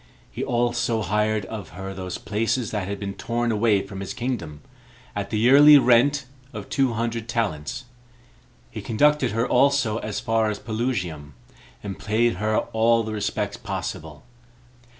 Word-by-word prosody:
He - - -4
also 120 -2 0
hired 105 +2 0
of 105 -7 -7
her 95 0 -6
those 95 -1 -5
places 115 +2 -1
that 105 -4 -3
had 100 0 -4
been 100 -1 -4
torn 120 +3 -2
away 105 -2 +2
from 95 0 -8
his 95 - -5
kingdom, 115 - -4 0.5
at - - -3
the 110 - -1
yearly 140 +6 +8
rent 135 +2 +4 0.3
of 105 -3 -8
two 135 -3 +1
hundred 115 0 -3
talents. 110 -5 -2 0.9
He - - -6
conducted 145 +3 +2
her 115 +2 0
also 135 -6 +2
as 105 -1 -4
far 115 -2 +1
as 105 - -3
Pelusium, 100 - -3 0.5
and 100 -2 -6
paid 110 0 +1
her 110 +2 0 0.2
all 115 +1 +3
the 110 0 -5
respects 105 0 -2
possible. 95 -8 -6
110 Hz, 150 wpm, -24 LUFS, 100-120 Hz, 0.9 s, yearly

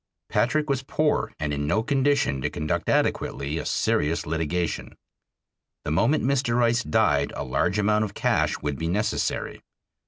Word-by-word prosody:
Patrick 150 +5 +1
was 135 -2 0
poor 150 +3 0
and 75 -1 -2
in 75 0 -2
no 110 +8 +1
condition 135 - +1
to - - 0
conduct 75 0 -2
adequately 70 +4 0
a - - -4
serious 75 +3 0
litigation. 80 +1 -2 0.9
The - - -2
moment 115 - +2
Mr. 130 -3 +1
Rice 120 0 +3
died 75 -13 +2
a - - -3
large 90 +9 0
amount 105 +1 +2
of 100 - -8
cash - - +1
would 75 -2 -2
be 80 - -2
necessary. 105 +5 -1
105 Hz, 155 wpm, -25 LUFS, 75-125 Hz, 0.9 s, Rice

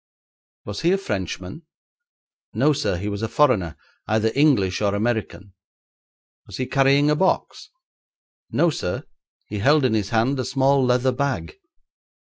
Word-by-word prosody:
'Was 105 0 -6
he 170 - +2
a - - +2
Frenchman?' 95 - -5 0.9
'No, 150 - +3
sir; 115 - -1
he 100 +4 -5
was 100 0 -4
a 110 - -1
foreigner, 110 - +1 0.3
either 110 +1 +1
English 125 -12 +2
or 100 -1 +1
American.' 105 -3 -3 0.9
'Was - - -8
he 130 - -2
carrying 140 +2 +3
a - - +3
box?' 190 +4 -1 0.8
'No, 170 - +2
sir; 90 -10 -4 0.4
he 105 - -6
held 145 +6 +3
in 125 - +1
his 105 -3 -1
hand 120 +4 +1
a - - 0
small 135 +1 +2
leather 125 +1 +2
bag.' 140 - -3
125 Hz, 145 wpm, -22 LUFS, 105-140 Hz, 0.9 s, No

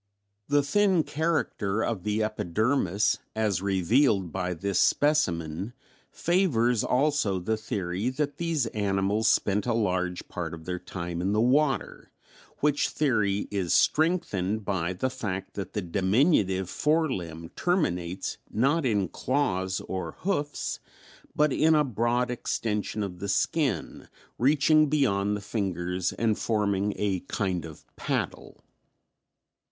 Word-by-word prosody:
] 100 0 -51
"The 145 0 +3
thin 190 +2 +3
character 145 -11 -1
of 110 -5 -2
the 105 +2 0
epidermis 110 0 +1 0.2
as 105 -5 0
revealed 100 - +2
by 90 0 -2
this 100 +4 -1
specimen 95 - +1 0.4
favors 125 - +1
also 135 -7 +1
the 100 +5 -1
theory 105 -1 -2
that 145 +2 -2
these 165 -6 0
animals 100 +1 +1
spent 105 +3 +2
a 120 - +1
large 90 -4 -1
part - - -5
of 80 -1 -13
their 90 0 -3
time 90 -1 -5
in 95 +3 0
the 105 - +2
water, 135 +4 +1 0.5
which 145 -1 +2
theory 105 -9 +1
is 95 -4 0
strengthened 110 - +1
by 95 -3 -1
the 130 +8 -2
fact 95 -6 -4
that 95 -3 -6
the 105 - -2
diminutive 95 - +2
fore 155 - +1
limb 85 -4 -5
terminates 95 - -1
not 135 +5 +1
in 100 -5 +1
claws 95 -7 -1
or 95 -1 -5
hoofs, 150 -6 -2 0.6
but 150 -2 +3
in 160 +1 +4
a 150 - +4
broad 120 0 0
extension 105 -3 -2
of 90 -3 -6
the 100 +1 -4
skin, 125 - -1 0.3
reaching 150 +3 +4
beyond 105 -9 +1
the - - -8
fingers 90 -3 -2
and 110 -2 0
forming 105 -2 0
a 100 -3 0
kind 95 -5 -2
of 80 -2 -11
paddle. - - -3
105 Hz, 130 wpm, -27 LUFS, 95-140 Hz, 0.6 s, in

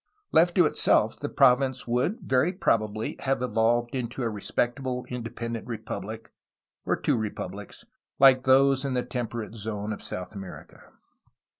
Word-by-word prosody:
Left 170 +2 +4
to 180 - +6
itself - - +2
the - - -3
province 130 0 +3
would 125 - 0
very 130 +7 +2
probably 110 - 0
have 135 -2 -1
evolved 120 0 +1
into 125 0 -3
a 115 - 0
re 105 -1 -7
spectable 125 +2 -2
independent 115 -1 -5
republic, 110 -1 -6 0.3
— - - -58
or - - +2
two - - 0
republics, 105 -2 -6 0.2
— - - -55
Hke 130 -2 +7
those 135 +1 +4
in 135 -2 -2
the 125 - +1
temperate 115 -3 -4
zone 105 -1 -4
of - - -8
South 90 +2 -6
America. 95 -3 -10
120 Hz, 155 wpm, -27 LUFS, 110-130 Hz, 0.3 s, Hke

